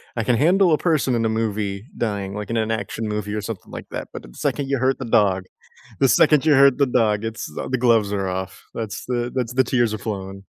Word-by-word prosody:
I 115 - -1
can 125 - +2
handle 180 +4 +4
a - - +4
person 155 -6 +1
in 115 - 0
a - - +2
movie 105 -2 -2
dying, 100 -4 -2
like 105 0 -6
in 115 - -1
an 110 0 0
action 110 +1 -3
movie 105 0 -3
or 105 - -2
something 105 -1 -7
like - - -8
that, - - -5
but - - -7
the - - -14
second 140 -2 -1
you 140 -2 0
hurt 130 +2 +1
the 130 - -4
dog, 100 -5 +2 0.6
the 135 - +5
second 150 -2 +5
you 155 - +5
hurt 140 -1 +6
the 140 - +4
dog, 110 -4 +1
it's 110 -8 -5
uh, - - -4
the 130 - 0
gloves 115 -4 +3
are 95 -2 -1
off, 95 0 -5
that's 110 -1 -5
the 120 -1 -2
that's 125 -2 -2
the 130 - +4
tears 120 -3 +1
are 110 - -4
flowing. 95 -2 -6
115 Hz, 250 wpm, -22 LUFS, 105-125 Hz, 0.6 s, hurt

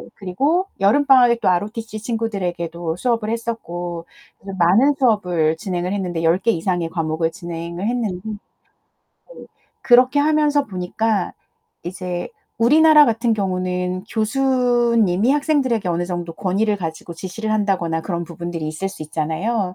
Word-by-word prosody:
그리고 280 - 0
여름 250 +9 +4
방학에 245 -3 +6
또 - - 0
ROTC 215 +4 -2
친구들에게도 175 -7 -3
수업을 230 -2 -1
했었고. 175 -7 -4 0.3
그래서 195 0 -8
많은 215 +12 +4
수업을 180 -10 +2
진행을 180 +1 -3
했는데 180 -4 -2
10 165 +2 +4
개 230 +3 +2
이상의 175 -2 -1
과목을 160 -1 -1
진행을 170 +2 -5
했는데 220 -7 -2 0.9
네. - - -16 0.4
그렇게 255 +3 +5
하면서 295 -1 +2
보니까 195 +2 -1 0.5
이제 180 0 -4 0.3
우리나라 300 +4 +6
같은 230 0 +1
경우는 185 -1 -2
교수님이 240 -3 +2
학생들에게 275 - +1
어느 175 +1 0
정도 175 -2 -4
권위를 205 +3 0
가지고 165 -1 -6
지시를 205 +6 -5
한다거나 185 -6 0
그런 170 -1 -3
부분들이 170 -2 -5
있을 175 +5 -3
수 175 - -9
있잖아요. 180 +6 -2
195 Hz, 340 characters per minute, -20 LUFS, 175-235 Hz, 0.9 s, 방학에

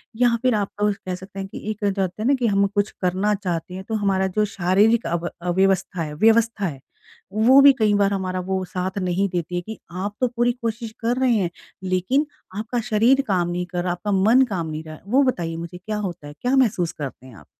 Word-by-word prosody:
या 240 0 +3
फिर 255 -2 +2
आप 200 - -3
अ, 210 0 +3
कह 185 -2 -5
सकते 190 +2 -10
हैं, 195 - -4
कि - - -9
एक 210 -1 -4
जो 200 -1 0
होता 185 +2 -3
है 225 - 0
ना 280 - +5
कि 240 - +2
हम 200 -1 +3
कुछ 205 +1 -1
करना 190 +3 +1
चाहते 180 -3 -4
हैं। 190 +1 -6
तो 220 - -1
हमारा 190 -1 +2
जो 210 - +4
शारीरिक 205 +5 +3
अब 170 0 -2
अव्यवस्था 185 0 +1
है 150 -2 -4
व्यवस्था 225 +3 +3
है, 145 -7 -4 0.5
वो 235 +6 +6
भी 280 0 +8
कई 215 -2 +3
बार 200 0 +3
हमारा 185 -1 -2
वो 190 -1 0
साथ 185 +2 -4
नहीं 185 +1 0
देती 175 -1 -3
है। 175 - -1
कि 220 +5 -8
आप 195 +4 -4
तो 255 - +4
पूरी 240 0 +1
कोशिश 230 0 -3
कर 235 +2 0
रहे 260 -2 +3
हैं। 185 -4 0 0.3
लेकिन 185 - +1 0.3
आपका 225 +3 -2
शरीर 235 +5 +4
काम 180 -4 +1
नहीं 175 +1 -2
कर 180 0 -3
रहा, 180 - 0
आपका 180 +4 -3
मन 210 +7 +5
काम 175 -5 -2
नहीं 155 0 -5
क 155 0 -9
वो 260 +7 +4
बताइए 170 -11 -1
मुझे 170 +2 -7
क्या 210 +4 -4
होता 180 -7 -5
है। 145 - -9
क्या 250 +2 +1
महसूस 210 -10 +2
करते 140 -5 -7
हैं 125 - -13
आप? - - -15
195 Hz, 235 wpm, -22 LUFS, 180-220 Hz, 0.5 s, भी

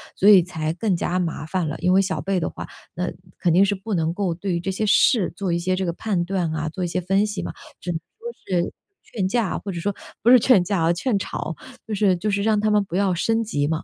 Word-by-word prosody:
所 200 - +4
以 195 -3 +9
才 160 -3 -3
更 190 +2 0
加 180 +1 -1
麻 165 -3 -3
烦 175 0 -1
了。 150 - -4
因 180 +1 +2
为 190 - +5
小 190 -1 -2
辈 195 0 0
的 165 - -2
话， - - -8 0.3
那 180 +1 -2 0.3
肯 175 - +2
定 190 +3 +6
是 205 +1 0
不 205 +2 -5
能 165 -1 0
够 185 -2 -1
对 180 +2 -3
于 170 - -1
这 190 - -2
些 215 +3 -1
事 205 -1 +4
做 190 -2 -2
一 170 - +1
些 185 +2 0
这 190 0 -2
个 170 - 0
判 185 -1 -1
断 180 -2 -1
啊、 155 0 -2
做 180 +4 -7
一 - - -1
些 180 - -2
分 195 +3 +2
析 205 -1 -4
嘛， - - -4 0.3
只 175 - -3
能 160 - -2 0.2
说 475 +1 -6 0.3
是 - - -5 0.3
劝 195 -5 -2
架， 225 -1 0
或 200 - -5
者 175 - -5
说 200 +3 -2 0.3
不 235 - +5
是 255 - +9
劝 225 -5 +5
架 180 -2 0
哦， 165 - +3
劝 210 +4 0
吵， 165 -4 -4 0.3
就 215 - -4
是 195 -2 +3
就 210 +4 -2
是 200 0 0
让 215 -1 +2
她 215 +1 +1
们 210 -1 +3
不 185 -3 -7
要 195 -1 +2
升 225 +6 +1
级 145 -9 -1
嘛。 160 0 -2
185 Hz, 295 characters per minute, -23 LUFS, 170-205 Hz, 0.3 s, 以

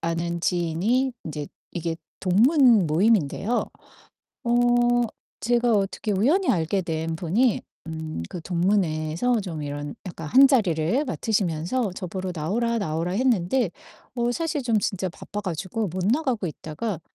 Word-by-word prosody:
아는 170 +1 -2
지인이 185 +11 +1
인제 150 -2 -5 0.3
이게 165 -1 -3 0.2
동문 230 - +5
모임인데요 195 - +2 0.8
어 235 - -1 0.9
제가 240 +2 +2
어떻게 205 +1 0
우연히 300 - +2
알게 175 +2 +1
된 160 -1 -2
분이 200 +9 +2 0.3
음 160 -1 -5 0.2
그 175 - -6
동문회에서 175 +4 +1
좀 165 -6 -5
이런 145 0 -5
약간 160 -3 -6
한 270 - +8
자리를 215 - +2
맡으시면서 200 -1 -1
저 185 - -5
보러 185 +1 -4
"나오라, 230 +9 0
나오라." 165 -2 -2
했는데 230 -1 +1 0.4
어 240 -1 0
사실 310 0 -2
좀 230 -3 +2
진짜 190 -2 -1
바빠 205 +4 -7
가지고 190 +3 -3
못 180 +2 -3
나가고 250 - +1
있다가 165 +5 -5
190 Hz, 285 characters per minute, -25 LUFS, 165-235 Hz, 0.9 s, 한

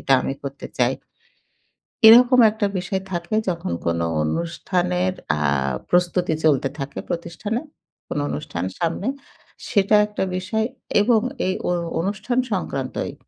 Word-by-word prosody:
এটা 135 - +1
আমি - - -2
করতে 140 0 -7
চাই।" - - +3 1.1
এরকম 245 +3 +8
একটা 210 -1 -1
বিষয় 185 +1 -2
থাকে 170 +4 -3
যখন 170 - -2
কোন 85 0 +1 0.2
অনুষ্ঠানের 180 - -1 0.2
আ - - -4 0.5
প্রস্তুতি 175 -1 +2
চলতে 140 -3 +3
থাকে 140 0 -5
প্রতিষ্ঠানে। 175 +7 -3 0.5
কোন - - -3
অনুষ্ঠান 150 -8 -4
সামনে, 170 +5 -1 0.6
সেটা 200 0 +3
একটা 210 -2 -3
বিষয় 215 +4 -1 0.4
এবং 225 +1 +4 0.3
এই 185 - +1
অ - - +1 0.3
অনুষ্ঠান 205 +7 -2
সংক্রান্তই 135 -9 -3
180 Hz, 120 wpm, -22 LUFS, 160-205 Hz, 1.1 s, এরকম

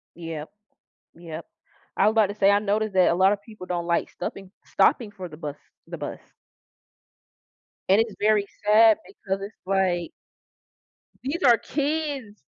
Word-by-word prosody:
Yup, 165 -3 -6 0.6
yup. 165 -1 -8 0.5
I 200 - +4
was - - +5
about 220 -2 +4
to 205 - -6
say 200 -1 +4
I 205 - +4
noticed 210 0 -1
that 185 -1 +4
a 170 - +1
lot 190 +2 +5
of 205 -1 -1
people 215 -4 -11
don't, 175 -1 -2
like, 170 0 0
stuffing 195 -1 -7
stopping 230 -5 +2
for 185 -4 -8
the 150 - -11
bus 150 -3 -5 0.3
the - - -7
bus. - - -6 1.7
And 195 +3 +6
it's 225 -3 -3
very 210 -1 +3 0.2
sad 220 +1 +6
because 195 0 -5
it's, 205 +2 -7
like 185 -3 0 1.1
these 315 +7 -3
are 240 -3 +7
kids! 285 - -3
200 Hz, 160 wpm, -25 LUFS, 180-220 Hz, 1.7 s, are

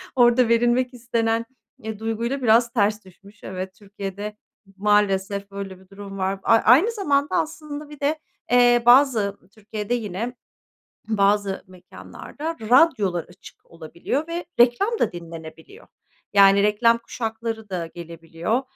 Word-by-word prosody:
orada 245 0 +4
verilmek 240 +2 +2
istenen, 230 -1 -1 0.4
eee, 220 -1 -6
duyguyla 230 +4 -3
biraz 235 0 +3
ters 210 -2 0
düşmüş. 200 +3 -19
Evet, 185 0 -6
Türkiye'de 205 +1 -7 0.4
maalesef 200 -1 +1
böyle 195 -2 -7
bir 190 0 -22
durum 195 0 -9
var. 190 0 -1
A - - +4
a 225 - +4
aynı 295 - +5
zamanda 290 -10 0
aslında 300 -1 -4
bir 295 -1 -12
de, 295 +2 0 0.3
eee, 245 -1 +5
bazı 240 -6 +4
Türkiye'de 215 0 -5
yine 230 +1 -3 0.7
bazı 200 -2 +1
mekânlarda 280 - -9
radyolar 220 - +3
açık 180 - -17
olabiliyor 170 - -4
ve 340 +1 -4
reklam 395 - +3
da - - +1
dinlenebiliyor. 165 - -11 0.5
Yani 200 0 +6
reklam 230 +3 +3
kuşakları 225 -2 -5
da 175 -3 -3
gelebiliyor. 170 +6 -3
220 Hz, 130 wpm, -23 LUFS, 195-245 Hz, 0.7 s, Yani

